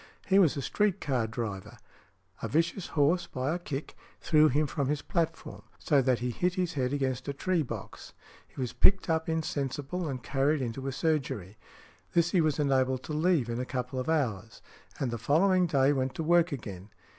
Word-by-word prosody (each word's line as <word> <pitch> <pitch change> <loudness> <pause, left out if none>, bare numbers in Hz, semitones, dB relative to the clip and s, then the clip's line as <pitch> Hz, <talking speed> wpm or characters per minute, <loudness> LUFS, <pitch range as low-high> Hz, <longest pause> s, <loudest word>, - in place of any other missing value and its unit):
He 195 0 +4
was 165 -6 +4
a 140 - -3
street 205 +3 +1
car 125 -5 0
driver; 110 -4 -5 0.6
a - - -2
vicious 165 +4 0
horse 155 +5 +3
by 130 +4 -2
a 175 - -2
kick 150 -4 -6 0.2
threw 155 -1 +4
him 150 +2 +2
from 140 -1 -2
his 150 +1 -1
platform, 170 -4 -2 0.2
so 140 -2 +2
that 130 -1 +2
he 125 +1 -2
hit 180 +8 0
his 180 -2 -1
head 130 -2 -1
against 130 -2 -2
a 140 - -2
tree 175 +4 0
box. 140 - -7 0.3
He - - -14
was 125 -2 -2
picked 190 -3 +4
up 160 0 0
insensible 155 +1 -2
and 130 -4 -5
carried 140 +1 +1
into 130 +3 -4
a - - -1
surgery; 130 - -2 0.5
this 170 0 +3
he 180 - +3
was 155 -3 +1
enabled 130 -3 +1
to 155 - -5
leave 160 -3 +2
|165| - - -10
in 115 - -3
a 125 - -2
couple 125 0 -3
of 130 - -3
hours, 115 -9 -1 0.4
and 130 -3 -1
the 120 - -4
following 180 - +3
day 140 -2 +3
went 130 -1 -1
to 160 - -3
work 170 +1 +3
again. 100 -7 -7
140 Hz, 200 wpm, -29 LUFS, 130-165 Hz, 0.6 s, He